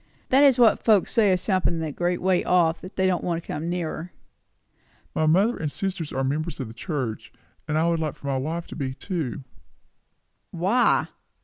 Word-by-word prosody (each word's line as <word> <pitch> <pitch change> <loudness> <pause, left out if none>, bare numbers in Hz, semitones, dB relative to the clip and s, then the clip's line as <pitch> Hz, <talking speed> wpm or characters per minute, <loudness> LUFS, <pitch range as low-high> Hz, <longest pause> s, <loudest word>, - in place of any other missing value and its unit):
"That 270 +2 +5
is 270 -3 +6
what 235 -3 +4
folks 210 -5 +3
say 210 -4 +4
of 185 - +2
something 185 -3 0
a 155 - -3
great 175 +4 -1
way 185 -1 +2
off, 170 -2 +2
and 185 - -8
that - - -38
they 190 - +1
don't 185 -2 +1
want 170 -2 -1
to 170 - -15
come 160 +3 -3
nearer." 175 0 -4 1.0
"My 155 - +1
mother 200 +9 +3
and 150 -2 -3
sister 190 -1 -3
are 135 - +1
members 155 +5 -2
of 130 - -4
the - - -10
church; 125 -3 -4 0.4
and 155 0 0
I 160 +2 +2
should 165 - 0
like 155 -3 -4
my 140 -1 -1
wife 160 +6 -3
to - - -8
be, 130 -3 -3
too." 155 - -4 1.1
"Why?" 195 +9 +2
170 Hz, 200 wpm, -25 LUFS, 155-185 Hz, 1.1 s, is